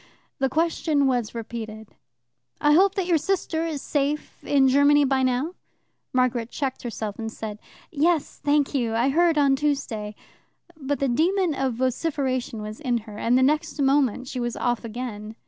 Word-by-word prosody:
The 270 -1 +1
question 315 -1 +1
was 245 -4 0
repeated: 220 -2 -6 0.7
"I 295 - +3
hope 385 +4 +4
that 385 - 0
your 340 -3 +2
sister 330 -2 -1
is 300 -4 -4
safe 290 +1 -2
in 275 -2 +3
Germany 285 +2 +5
by 265 0 +1
now." 260 +6 0 0.6
Margaret 250 -2 +1
checked 270 -2 -3
herself 220 -3 -5
and 225 -1 -4
said, 215 -2 -6 0.3
"Yes, 320 0 0
thank 290 0 +2
you; 235 -5 0
I 240 +4 +2
heard 330 +2 +3
on 280 -2 +4
Tuesday." 265 -8 -2 0.6
But 285 -2 -3
the 275 - +2
demon 340 +7 +2
of 265 -3 -1
vociferation 255 -3 -1
was 215 +1 -7
in 250 -5 0
her, 210 -2 -9
and 240 +2 +3
the 260 - +4
next 300 +2 +1
moment 270 -3 +2
she 255 - -4
was 240 -1 -2
off 240 -1 -1
again. 220 -2 -6
270 Hz, 165 wpm, -24 LUFS, 235-295 Hz, 0.7 s, Germany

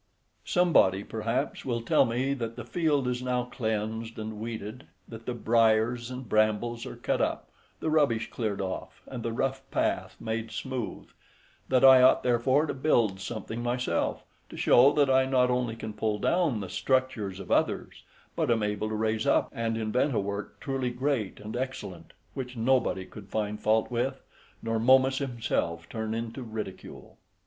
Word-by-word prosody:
Somebody, 160 - +3
perhaps, 115 +7 -2
will 120 -3 -2
tell - - +4
me 125 +4 0
that 115 -4 -4
the 120 - -7
field 145 -1 +1
is 125 0 -1
now 125 -1 0
cleansed 110 -2 -3
and 110 -1 -5
weeded, 110 +1 -6 0.2
that 115 0 -10
the 125 - -2
briars 115 +1 +2
and 130 -1 -7
brambles 110 +2 +1
are - - -7
cut - - -1
up, - - -2 0.3
the 160 - 0
rubbish 140 -8 +2
cleared 105 -4 -2
off, 95 -1 -5
and 125 -3 -7
the 115 - -2
rough 135 +3 -1
path - - -1
made 110 0 -3
smooth; 125 +2 -5 0.6
that 130 0 +5
I 130 -1 +9
ought 130 - +5
therefore 130 +4 +3
to - - -3
build 120 -8 +2
something 110 +3 -5
myself, 120 -7 -1 0.3
to - - -10
show 130 +4 +6
that 145 -2 +3
I 130 0 +4
not 125 -1 +3
only 125 -2 0
can 110 -1 -6
pull 105 0 -1
down 155 - +1
the 95 - -5
structures 130 -8 0
of - - -8
others, - - 0 0.3
but - - 0
am 115 -2 +2
able 105 +1 -1
to 110 - -2
raise 110 0 0
up - - +3
and 115 -1 -1
invent 115 +5 0
a - - +3
work 100 0 -4
truly 135 -2 -2
great 125 -4 -2
and 105 +2 -7
excellent, 120 -10 -5 0.2
which 125 -2 -6
nobody 115 -5 +1
could 100 +1 -12
find 105 0 -2
fault 110 +2 +2
with, 130 +3 -1 0.4
nor 115 0 0
Momus 130 +3 +4
himself 115 - -2
turn 110 0 -3
into 115 +3 -4
ridicule. 110 -5 -8
115 Hz, 170 wpm, -28 LUFS, 110-130 Hz, 0.6 s, I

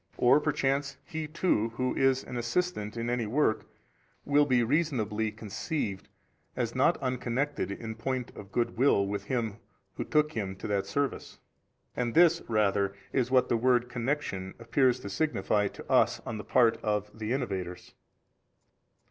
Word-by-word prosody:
Or 125 +4 +5
perchance 140 -2 0
he 160 +1 -4
too 150 - +1
who 130 +1 0
is 135 0 +2
an - - -8
assistant 120 -2 -1
in 115 0 -2
any 120 -2 -1
work 115 -1 +1 0.6
will 145 0 +4
be 125 -3 +3
reasonably 115 -6 0
conceived 110 - -4 0.5
as - - -1
not - - +3
unconnected 130 +2 -1
in 110 +3 -5
point 125 +2 -3
of 100 -1 -10
good 115 0 -1
will 125 -7 +4
with 100 0 -3
him 115 -3 -2 0.4
who - - -1
took 150 0 +2
him 100 -6 -3
to - - -7
that 100 -1 0
service. 140 +7 -2 0.6
And 120 -2 -2
this 170 0 +6
rather 100 -3 +1 0.2
is 125 -3 +1
what 130 -1 +4
the 120 - +2
word 125 0 +2
connection 120 -7 -3
appears 125 +2 +2
to 100 - -6
signify 105 -6 +1
to - - -10
us - - +3
on 110 -1 -4
the - - -6
part 115 +2 +3
of 105 -1 -2
the 110 0 -4
innovators. 95 -9 -3
120 Hz, 155 wpm, -29 LUFS, 105-135 Hz, 0.6 s, this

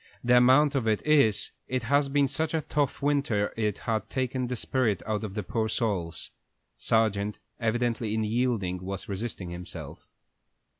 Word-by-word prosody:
The 125 0 +5
amount 130 +4 +5
of 130 -5 0
it 110 -1 +1
is, 140 -9 +3 0.2
it 130 -1 -1
has 140 +4 +2
been 140 0 +3
such 160 +4 -1
a 160 - +1
tough 145 -2 -1
winter 140 -8 +1
it 105 -3 -1
has 110 -2 +1
taken 130 -1 -1
the 125 - -2
spirit 115 -5 0
out 110 -1 -2
of 100 -2 -5
the 105 - -2
poor 110 +5 -1
souls." 95 - -2 0.4
Sargent, 105 - +1 0.2
evidently, 115 -1 0
in 110 - 0
yielding 105 -5 0
was 95 0 -5
resisting 100 -3 -4
himself. 85 0 -8
115 Hz, 160 wpm, -28 LUFS, 105-130 Hz, 0.4 s, The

